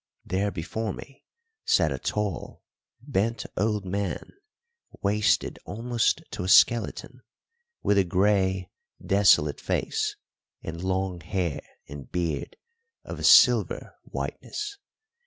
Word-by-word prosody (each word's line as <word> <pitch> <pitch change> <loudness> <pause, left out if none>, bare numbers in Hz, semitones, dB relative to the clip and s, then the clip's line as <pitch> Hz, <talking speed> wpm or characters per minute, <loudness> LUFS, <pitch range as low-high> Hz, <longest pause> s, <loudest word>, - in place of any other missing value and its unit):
There 100 +2 0
before 100 +5 -4
me 135 - -12 0.4
sat 80 -4 +3
a 65 - -3
tall, 105 0 -3 0.4
bent 115 -3 -1
old 105 0 0
man, 100 0 -3 0.7
wasted 105 +1 +1
almost 115 +3 0
to - - -4
a 90 - -3
skeleton, 95 +7 +3 0.6
with 100 - +3
a - - +5
grey, 95 0 +1 0.3
desolate 95 -7 +4
face - - -1 0.5
and 85 +2 -6
long 95 -1 -1
hair 85 -1 -2 0.3
and 70 -1 -10
beard 85 -5 -3 0.5
of - - -7
a - - -6
silver - - +5
whiteness. 415 -1 -5
95 Hz, 110 wpm, -26 LUFS, 85-105 Hz, 0.7 s, a